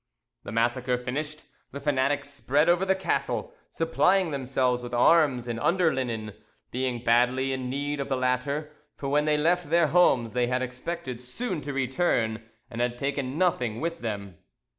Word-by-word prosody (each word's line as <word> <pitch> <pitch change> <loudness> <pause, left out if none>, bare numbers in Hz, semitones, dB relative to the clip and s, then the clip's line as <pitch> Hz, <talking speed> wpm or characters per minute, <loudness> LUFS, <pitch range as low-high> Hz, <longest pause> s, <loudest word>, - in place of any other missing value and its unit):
The - - -8
massacre 120 +2 +1
finished, 145 +5 -4 0.3
the 140 - -6
fanatics 140 0 0
spread 145 +2 +1
over 175 +2 +3
the 190 0 +3
castle, 190 - -2 0.2
supplying 180 +2 +2
themselves 130 -2 0
with 120 0 -5
arms 130 -2 +4
and 120 -1 -3
under 170 +3 +2
linen, 115 -5 -3 0.4
being 125 -1 -2
badly 125 +3 +3
in 130 -1 -3
need 145 +2 -2
of 140 - -3
the 135 - +1
latter; 130 +4 -1 0.2
for 140 - -4
when 150 +1 +2
they 150 -1 +3
left 170 +1 +1
their 170 +1 +4
homes 130 -10 +3
they 125 0 +1
had 125 +1 0
expected 130 0 -5
soon 175 - -4
to 145 +1 -5
return, 130 -4 0 0.3
and 115 0 -5
had 120 0 0
taken 140 0 -2
nothing 125 -11 +1
with 165 +2 -3
them. 100 -6 -5
130 Hz, 165 wpm, -27 LUFS, 125-155 Hz, 0.4 s, arms